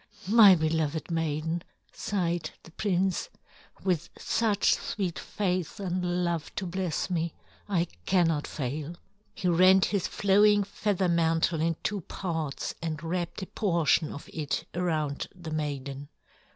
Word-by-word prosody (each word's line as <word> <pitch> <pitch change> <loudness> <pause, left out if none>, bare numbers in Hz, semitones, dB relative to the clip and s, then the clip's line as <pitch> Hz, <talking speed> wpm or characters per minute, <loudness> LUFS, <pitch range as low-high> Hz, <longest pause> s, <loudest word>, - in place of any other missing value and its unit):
"My 210 -2 +8
beloved 160 0 -1
maiden!" 160 +1 -1 0.3
sighed 175 -4 -1
the 165 - -14
prince. 190 0 0 0.5
"With 180 -5 0
such 215 -3 +2
sweet 185 -5 -3
faith 185 -4 -2
and 180 -2 -1
love 170 -3 -2
to 190 - -2
bless 185 0 -2
me, 170 -1 -1 0.3
I 175 -4 +2 0.2
cannot 165 -5 +2
fail." 150 +4 -4 0.4
He 195 -4 -2
rent 185 +2 +6
his 200 -4 0
flowing 205 +1 +4
feather 200 -1 0
mantle 165 -1 +2
in 165 0 +1
two 205 -2 -1
parts 160 -5 -3
and 160 -1 -3
wrapped 175 +2 -3
a - - -3
portion 170 -6 +1
of 145 - -8
it 150 -3 -2
around 155 -5 -1
the 170 -3 -8
maiden. 140 -2 -4
170 Hz, 130 wpm, -28 LUFS, 160-190 Hz, 0.5 s, My